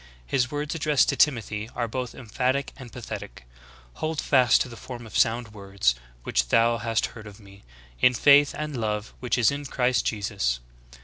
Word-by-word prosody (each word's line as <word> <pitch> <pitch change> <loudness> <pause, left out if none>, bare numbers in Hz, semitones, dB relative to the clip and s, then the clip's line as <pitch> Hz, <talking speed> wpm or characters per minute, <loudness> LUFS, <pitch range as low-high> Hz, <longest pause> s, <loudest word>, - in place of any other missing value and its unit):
His 130 - 0
words 145 +1 -3
addressed 150 -3 +2
to - - +1
Timothy 110 -6 +1
are 120 - -1
both 125 +1 -4
emphatic 130 +4 -2
and 130 -4 -11
pathetic: 105 - -8 0.6
"Hold 155 -1 -1
fast 130 -3 +4
the 120 - -10
form 120 0 -9
of 110 - -11
sound 115 -1 +1
words, 100 - 0 0.3
Vv'hich 60 -1 +1
thou 115 - +3
hast 115 0 0
heard 110 -2 -10
of 105 0 -12
me, 100 -1 -16 0.4
in 125 - +4
faith 145 +3 +5
and 150 -1 -4
love 105 0 -3
which 125 0 -1
is 120 -1 +4
in 145 +1 -5
Christ 125 -3 +1
Jesus. 100 - -1
120 Hz, 175 wpm, -25 LUFS, 105-130 Hz, 0.6 s, faith